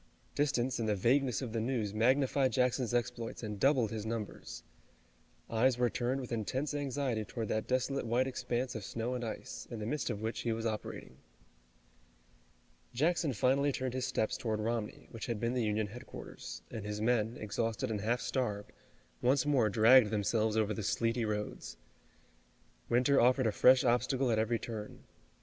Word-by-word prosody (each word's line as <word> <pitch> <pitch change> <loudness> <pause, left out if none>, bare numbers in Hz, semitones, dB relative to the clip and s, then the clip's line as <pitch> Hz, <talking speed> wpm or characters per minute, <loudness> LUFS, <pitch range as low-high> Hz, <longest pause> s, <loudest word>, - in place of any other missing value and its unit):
Distance 130 -4 0
and 110 -2 0
the 105 - +2
vagueness 125 +4 +2
of 115 -3 -5
the 115 - 0
news 115 -4 -1
magnified 130 +3 +3
Jackson's 125 -1 +1
exploits 120 -1 -2
and 105 -2 -5
doubled 130 -4 +3
his 110 -2 -4
numbers. 110 -1 -5 0.8
Eyes 120 +2 +2
were 125 -1 +2
turned 125 +2 -1
with 125 - -8
intense 130 +6 -2
anxiety 135 -5 -1
toward 110 0 -5
that 110 - -1
desolate 130 0 0
white 120 +3 +2
expanse 125 -1 -2
of 110 - -5
snow 115 +4 -3
and 125 -1 -3
ice, 110 - -6
in 120 - -5
the 105 - -4
midst 150 +5 -2
of 100 - -2
which 110 +2 -3
he 115 - -1
was 115 0 -2
operating. 105 - -5 1.8
Jackson 160 +3 +2
finally 135 +5 +2
turned 130 -2 -3
his 130 -1 -1
steps 115 +4 0
toward 110 -5 -2
Romney, 110 0 -3
which 115 - -6
had 115 -3 -2
been 115 +2 0
the 125 -2 0
Union 105 0 0
headquarters, 115 +5 -9
and 110 -3 -5
his 105 0 -4
men, 115 0 +1
exhausted 115 +3 -2
and 105 -2 -2
half 120 +4 0
starved, 105 -6 -2 0.5
once 130 +3 +3
more 135 -7 +3
dragged 115 +2 +6
themselves 110 +1 +1
over 110 -1 +2
the 110 - -4
sleety 115 +3 0
roads. 105 - -4 1.1
Winter 125 +4 +4
offered 125 +2 +4
a 110 - +3
fresh 130 +4 +6
obstacle 125 +1 +2
at 110 - +2
every 115 +1 +1
turn. 110 -2 -7
120 Hz, 170 wpm, -33 LUFS, 110-130 Hz, 1.8 s, dragged